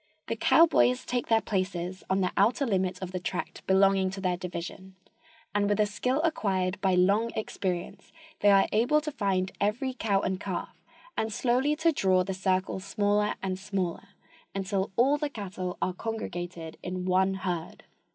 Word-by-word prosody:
The 230 - -2
cowboys 260 -2 +4
take 245 -1 -2
their 225 -1 +4
places 185 -2 -2
on 190 +1 +2
the 180 - +1
outer 230 +8 +3
limit 185 -5 0
of 185 - -5
the 185 - -3
tract 180 0 -4
belonging 190 0 +4
to 195 +1 -6
their 185 -2 0
division, 180 +1 -7 0.6
and 205 0 +1
with 205 0 +1
a 210 - +5
skill 250 +6 -1
acquired 190 - 0
by 190 -2 +3
long 200 +6 +3
experience 185 -5 -4 0.3
they 205 - +4
are 195 -1 +6
able 240 +8 +3
to 305 0 -4
find 190 -6 0
every 240 +6 0
cow 205 -6 +1
and 185 0 -1
calf 195 -3 -5 0.3
and 220 - -1
slowly 255 +6 +1
to 325 +2 +3
draw 190 -9 +2
the 190 - -3
circle 185 0 0
smaller 205 +1 +1
and 190 -1 -2
smaller, 195 -2 -3 0.5
until 195 0 -1
all 275 +5 +3
the 295 -1 -1
cattle 190 -7 -5
are 185 - 0
congregated 175 -6 -5
in 180 0 -4
one 190 +1 +2
herd. 180 -4 -4
195 Hz, 170 wpm, -28 LUFS, 185-220 Hz, 0.6 s, are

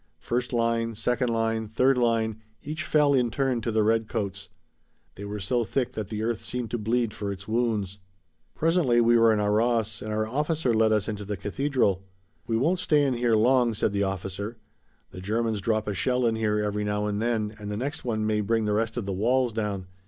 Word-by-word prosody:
First 125 +1 -2
line, 115 -1 0
second 125 +3 0
line, 115 -1 0
third 130 +5 +3
line, 115 -3 +1 0.2
each 155 +2 -4
fell 150 -2 +3
in 125 -3 +2
turn 130 -1 0
to 115 - -2
the 110 -1 +2
redcoats. 105 -3 -1 0.6
They 100 - -8
were 105 +1 -5
so 120 +5 0
thick 125 +2 -2
that 105 -3 -5
the 110 0 -3
earth 115 -2 -1
seemed 125 -3 -4
to 120 - -1
bleed 115 +1 0
for 100 -1 -4
its 95 0 -8
wounds. 110 -4 -1 0.6
Presently 160 -7 +2
we 120 0 +4
were 115 -1 +6
in 110 - +2
Arras 110 +1 +1
and 110 - -5
our 110 0 0
officer 150 +2 0
led 110 0 +3
us 105 -2 +1
into 105 -2 -4
the 100 0 -4
cathedral. 105 - 0 0.4
"We 115 - +1
won't 165 +9 +1
stay 150 -5 +3
in 135 - +1
here 120 -1 +2
long," 120 +1 +3
said 105 - 0
the 100 0 -1
officer. 95 +3 -3 0.5
"The 90 - -9
Germans 110 +1 -1
drop 110 +1 0
a 105 - -1
shell 125 +5 +1
in 115 -1 +2
here 110 -1 0
every 105 0 -1
now 105 0 -1
and 105 0 -2
then 110 -2 -1
and 105 -1 -6
the 105 - -3
next 140 +6 -4
one 110 -3 -1
may 105 0 +1
bring 110 +1 0
the 105 - +1
rest 115 +2 -1
of 120 - -2
the 100 - -2
walls 120 +5 +1
down. 105 -4 -2
115 Hz, 210 wpm, -26 LUFS, 105-120 Hz, 0.6 s, were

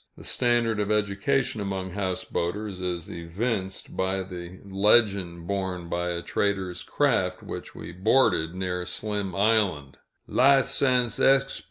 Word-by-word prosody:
The - - -12
standard 120 -3 +1
of 105 0 -1
education 105 +4 0
among 95 -2 -3
houseboaters 95 +1 -3
is 90 -1 -2
evinced 95 +3 -4
by 95 +1 0
the 90 -1 -9
legend 100 -3 +2
borne 95 -2 -3
by 85 +1 -1
a 85 0 -3
trader's 95 -3 -1
craft 95 -11 0
which - - -7
we - - -8
boarded 95 -3 +2
near 90 -1 -2
Slim 105 -3 -3
Island: 100 -10 +1 0.3
"Lisens 130 -3 +3
exp. 135 0 +3
95 Hz, 125 wpm, -26 LUFS, 90-110 Hz, 0.3 s, Lisens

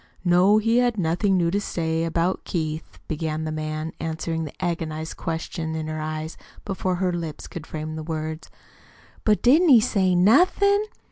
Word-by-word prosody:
"No, 180 +4 +5
he 225 +3 +3
had 245 -2 +1
nothing 185 +3 +1
new 170 -1 +2
to 200 +2 0
say 165 -4 -1
about 170 +3 0
Keith," 155 -2 -4
began 155 0 -2
the 155 - -3
man, 155 +1 -4
answering 160 0 -3
the 150 - -8
agonized 160 -2 -3
question 160 0 -4
in 160 -1 -3
her 155 0 -4
eyes 155 +1 -4 0.3
before 190 -2 -1
her 180 0 0
lips 165 -3 -5
could 160 -2 -8
frame 155 0 -5
the 160 - -5
words. 155 0 -5 0.8
"But 210 -1 +3
didn't 315 +8 +5
he 250 -5 +9
say 190 -4 +2
NOTHIN'?" 370 - +4
165 Hz, 165 wpm, -24 LUFS, 155-195 Hz, 0.8 s, he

